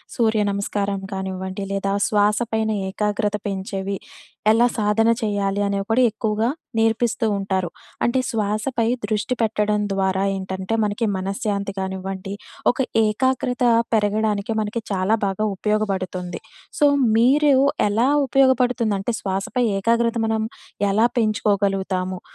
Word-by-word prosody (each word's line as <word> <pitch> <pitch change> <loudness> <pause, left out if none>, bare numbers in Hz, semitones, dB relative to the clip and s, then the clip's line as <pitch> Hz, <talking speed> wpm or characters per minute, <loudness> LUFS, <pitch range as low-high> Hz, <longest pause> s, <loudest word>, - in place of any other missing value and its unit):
సూర్యనమస్కారం 205 -3 0
కానివ్వండి, 190 +1 -4
లేదా 195 0 -1
శ్వాస 210 0 +2
పైన 220 0 +1 0.2
ఏకాగ్రత 210 +1 -1
పెంచేవి 195 0 -3 0.5
ఎలా 235 +2 +4
సాధన 215 +1 +2
చేయాలి, 200 -2 0
అనేవి 200 0 -1
కూడా 250 +3 +4
ఎక్కువగా 220 +1 -1 0.3
నేర్పిస్తూ 225 +2 +1
ఉంటారు. 190 -3 -1 0.3
అంటే 240 +2 +2
శ్వాసపై 220 +2 -1 0.2
దృష్టి 215 +3 -1
పెట్టడం 210 -1 +1
ద్వారా 190 0 +1
ఏంటంటే 190 +2 -4
మనకి 210 +2 -1
మనశ్శాంతి 200 +1 -2
కానివ్వండి, 190 0 -4 0.4
ఒక - - -14 0.3
ఏకాగ్రత 250 +3 0 0.3
పెరగడానికి 215 0 +1
మనకి 215 +2 -3
చాలా 195 +3 +2
బాగా 195 +2 -1
ఉపయోగపడుతుంది. 190 -3 -2 0.4
సో, 295 - +4 0.3
మీరు 280 +5 +4 0.4
ఎలా 220 +5 +2 0.2
ఉపయోగపడుతుందంటే 245 -5 +2
శ్వాసపై 195 +6 -1
ఏకాగ్రత 230 +3 +1
మనం 220 0 0 0.5
ఎలా 215 +4 +3
పెంచుకోగలుగుతాము? 195 -4 0
210 Hz, 105 wpm, -22 LUFS, 195-225 Hz, 0.5 s, ఎలా